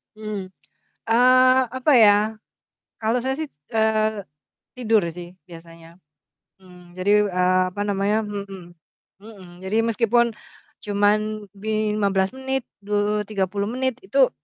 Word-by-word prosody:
Mmm. 215 -3 -6 0.6
Eee, 255 +2 +5
apa 260 +4 +2
ya. 215 -4 +7 0.8
Kalau 225 +2 0
saya 265 +1 -1
sih, 315 - -3 0.2
eee, 220 -2 +1 0.5
tidur 225 -3 +2
sih 175 +1 -10
biasanya. 165 0 -14 0.7
Mmm, 180 -1 -17
jadi, 185 +2 -2 0.2
eee, 180 -1 +2
apa 205 - -5
namanya 205 +1 0
mhm, 200 -4 -8 0.5
mhm. 205 -4 -13 0.2
Jadi 190 +3 -3
meskipun 230 +1 +2 0.6
cuman 210 +1 0
di 215 +1 -2
15 195 -2 +1
menit, 265 0 -2 0.2
du 210 0 0
tiga 200 -2 -1
puluh 200 +1 -2
menit, 260 -1 -2
itu, - - +3
210 Hz, 120 wpm, -22 LUFS, 195-225 Hz, 0.8 s, ya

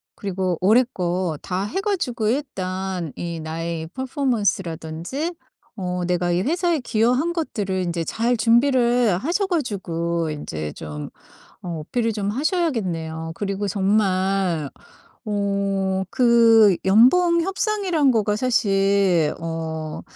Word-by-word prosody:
그리고 185 -3 -2
올해 220 +7 +5
거 175 -3 -1
다 185 +1 -2
해 380 - -3
가지고 290 - -1
일단 190 - -3
이 170 -1 -5
나의 160 +1 -4
퍼포먼스 260 -7 0
라든지 170 - -5 0.4
어 180 -2 -3
내가 175 0 0
이 175 +1 +1
회사에 335 - +1
기여한 250 +6 +1
것들을 210 - -3
인제 170 -1 -2
잘 235 +7 0
준비를 240 -2 +3
하셔 345 - -1
가지고 170 - -2
인제 80 - -5
좀 75 -1 -7 0.5
어 170 -3 -5
어필을 225 +8 -1
좀 205 -1 -1
하셔야겠네요. 200 - -2
그리고 200 0 -2
정말 190 -5 +1 0.6
어 200 -2 0
그 230 -5 +5
연봉 335 - +5
협상이라는 385 -6 +1
거가 210 -2 +1
사실 195 -8 +2
어 160 -1 -4
200 Hz, 240 characters per minute, -22 LUFS, 175-245 Hz, 0.6 s, 올해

